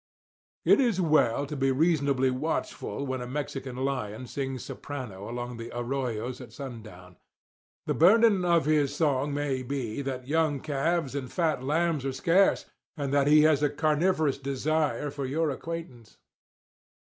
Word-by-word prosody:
It - - +6
is 235 -7 +1
well 150 -6 +3
to 150 +2 -6
be 135 -1 +1
reasonably 140 -3 +2
watchful 140 0 -3
when 130 -1 -3
a 125 - -5
Mexican 135 -1 -4
lion 130 -3 -3
sings 135 0 -4
soprano 115 -9 -7
along 120 0 -5
the 115 0 -7
arroyos 125 -1 -3
at - - -11
sundown. 110 - -10 0.7
The - - 0
burden 205 +2 +5
of 170 -4 +3
his 145 -2 +2
song 145 -2 +1
may 140 -2 -1
be 130 -2 -3
that 130 -2 -5
young 155 -1 +1
calves 155 0 -1
and 135 -3 -4
fat 165 -6 0
lambs 155 +1 0
are 135 -1 -2
scarce, 175 +8 +3 0.3
and 140 -2 -2
that 140 -1 +3
he 150 +1 +6
has 155 -2 +4
a 145 - +3
carnivorous 155 0 +1
desire 145 +2 -1
for 140 -2 -4
your 155 +3 0
acquaintance. 140 -7 -7
140 Hz, 150 wpm, -28 LUFS, 130-155 Hz, 0.7 s, It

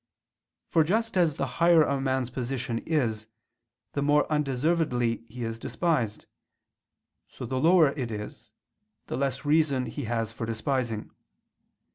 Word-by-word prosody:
For 160 - +3
just 220 +7 0
as 170 -5 +2
the 140 - 0 0.2
higher 170 -2 +7
a 140 -2 0
man's 130 -2 -1
position 125 -2 -3
is, 115 -9 0 0.7
the 140 - -1
more 145 +1 +3
undeservedly 135 -4 +1
he 120 +2 -6
is 115 0 -4
despised; 125 - -1 1.0
so - - -8
the 130 +2 -2
lower 165 0 +5
it 135 -4 -4
is, 105 -1 -7 0.5
the - - -4
less 135 0 -2
reason 145 -4 +2
he 145 - -5
has 115 -1 -1
for 115 0 -5
despising. 115 -1 -2
135 Hz, 135 wpm, -27 LUFS, 115-155 Hz, 1.0 s, higher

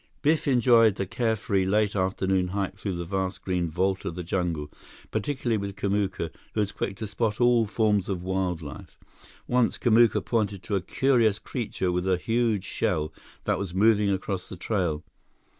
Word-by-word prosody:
Biff 155 +1 +2
enjoyed 120 -5 +5
the 100 - -2
carefree, 110 -2 0
late 105 +2 +1
afternoon 95 -1 +1
hike 100 +1 -2
through 100 -3 -4
the 85 0 -4
vast 95 +1 -3
green 90 -3 -1
vault 95 +4 0
of 85 - -4
the 90 - -4
jungle, 85 -4 -2 0.4
particularly 130 -6 -1
with 100 -1 -5
Kamuka, 100 -5 -1 0.2
who - - 0
was 105 -1 +1
quick 95 - -3
to 110 - -4
spot 105 +1 -1
all 120 -2 +4
forms 105 -2 +1
of 90 -3 -2
wild 95 -3 -1
life. 70 - -10 0.5
Once, 125 -2 +2
Kamuka 120 -1 +4
pointed 105 -5 -1
to 110 -3 -2
a 95 - +1
curious 115 0 +2
creature 110 -6 -3
with 90 +1 -1
a 90 - +3
huge 115 0 0
shell 75 -3 -1 0.3
that - - 0
was 95 -3 -4
moving 105 0 +4
across 95 -1 -2
the 95 - -8
trail. 85 -5 -1
100 Hz, 175 wpm, -26 LUFS, 90-110 Hz, 0.5 s, enjoyed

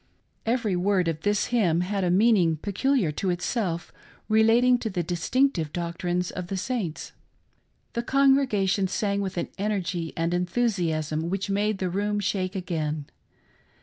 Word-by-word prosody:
Every 230 -5 +1
word 185 0 +1
of 160 -1 -2
this 205 +2 +1
h)min 180 -8 +2
had 195 +1 -1
a 180 - +1
meaning 185 -4 +4
peculiar 205 - 0
to 185 +5 -2
itself, 175 -1 -2 0.3
relating 230 +3 +4
to 225 - -3
the 180 -3 -2
distinctive 175 - 0
doctrines 175 +1 -2
of 180 -1 -5
the 195 - -3
Saints. 200 -6 -3 0.8
The 235 - -1
con 275 +2 +4
gregation 200 -8 +1
sang 200 0 0
with 190 -2 -4
an - - -2
energy 185 -5 -2
and 165 +1 0
enthusiasm 170 -5 0
which 195 +1 -2
made 205 +1 +1
the 185 -2 -2
room 205 +2 0
shake 190 -1 -1
again. 155 -5 -3
190 Hz, 150 wpm, -26 LUFS, 175-215 Hz, 0.8 s, meaning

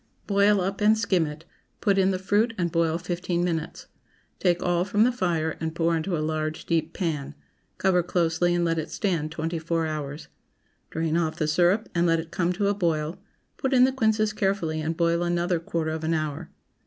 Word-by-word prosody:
Boil 200 0 +4
up 195 +3 -3
and 215 +1 +5
skim 185 -7 +1
it, 150 +2 -9 0.3
put 200 -2 +2
in 190 0 +4
the 190 - 0
fruit 210 +5 +1
and 170 -2 0
boil 165 -1 +1
fifteen 175 0 -2
minutes. 165 -3 -3 0.5
Take 175 -2 +1
all 175 0 +2
from 205 +3 +2
the 250 - +4
fire 170 -9 -1
and 160 0 -3
pour 165 0 +2
into 165 +2 -1
a 155 - -1
large 155 0 -3
deep 165 -1 0
pan. 150 -6 -3 0.4
Cover 185 -2 +3
closely 175 0 +1
and 175 0 +1
let 165 -1 +1
it 155 - -4
stand 165 -7 -1
twenty 165 +1 -3
four 165 0 -1
hours. 150 -1 -5 0.6
Drain 160 0 -1
off 160 -2 0
the 155 - -1
syrup 175 +7 +2
and 175 0 +2
let 165 0 +3
it 165 0 -7
come 175 -1 0
to 200 +2 0
a 200 - +3
boil; 165 -3 -1 0.4
put 265 0 0
in 250 - +6
the 260 - +4
quinces 220 -4 +1
carefully 190 -6 -1
and 160 +1 -2
boil 170 0 +2
another 175 0 0
quarter 165 -1 -2
of 160 0 -4
an 165 +1 +1
hour. 155 +1 -3
170 Hz, 205 wpm, -26 LUFS, 160-190 Hz, 0.6 s, in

